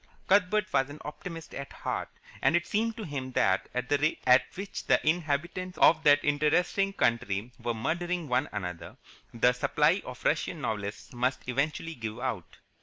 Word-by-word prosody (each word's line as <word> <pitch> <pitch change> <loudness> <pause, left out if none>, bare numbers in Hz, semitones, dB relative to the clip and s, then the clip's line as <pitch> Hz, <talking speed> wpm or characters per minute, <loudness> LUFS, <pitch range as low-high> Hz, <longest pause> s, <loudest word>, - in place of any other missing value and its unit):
Cuthbert 200 +1 +3
was 135 +1 +2
an 145 - -8
optimist 165 +2 -7
at 140 0 -6
heart, - - -4 0.3
and - - +4
it 175 0 +2
seemed 225 +2 -1
to 220 - -5
him 135 -6 -5
that, 95 -4 +2
at 125 0 -3
the 145 +1 +2
rate 155 +2 +1
at 125 0 +7
which 195 +1 -5
the - - +5
inhabitants 170 +3 -1
of 160 -1 +6
that 145 -1 +6
interesting 155 +7 +2
country 115 - 0
were 120 -1 -2
murdering 175 +7 -2
one 130 +3 +1
another, 90 -5 -6 0.3
the 125 +1 +3
supply 125 - +2
of - - -10
Russian - - 0
novelists 105 +1 -4
must 125 +2 -1
eventually 150 +6 -1
give 110 -4 -6
out. 120 -9 -4
145 Hz, 170 wpm, -29 LUFS, 125-175 Hz, 0.3 s, at